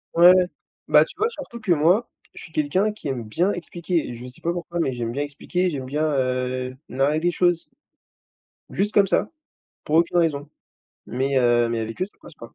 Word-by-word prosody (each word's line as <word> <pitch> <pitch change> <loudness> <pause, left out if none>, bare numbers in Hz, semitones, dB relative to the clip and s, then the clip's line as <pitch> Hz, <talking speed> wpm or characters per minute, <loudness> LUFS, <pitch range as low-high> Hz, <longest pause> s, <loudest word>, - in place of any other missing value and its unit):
Ouais, 175 +2 +9
ouais. 185 - +4 0.4
Bah - - +6
tu - - -8
vois, 435 +2 +1
surtout 240 - -8
que 210 -5 -1
moi, 175 +8 +3 0.2
je - - -9
suis 160 - -11
quelqu'un 165 +8 +1
qui 210 -7 -8
aime 130 -4 -3
bien 170 - 0
expliquer 175 -2 -2
et 120 - -6
je 120 +2 -9
sais 125 - -10
pas 170 - 0
pourquoi, 175 0 -4
mais 150 -5 +1
j'aime 120 -1 -3
bien 140 - -3
expliquer, 160 +5 -1
j'aime 135 -5 -4
bien, 150 +4 -1
heu, 130 -3 -1
narrer 140 +4 +1
des 175 +2 +1
choses. 175 -1 +1 1.0
Juste 205 +2 0
comme 205 -2 +4
ça, 195 - +1 0.5
pour 155 - +1
aucune 170 +1 +3
raison. 150 -4 +1 0.6
Mais, 135 +2 0
heu, 120 -1 +3
mais 115 -1 -1
avec 110 0 -6
eux, 185 - +1
ça 205 - -15
passe - - -13
pas. 115 -5 -13
155 Hz, 210 wpm, -23 LUFS, 130-180 Hz, 1.0 s, Ouais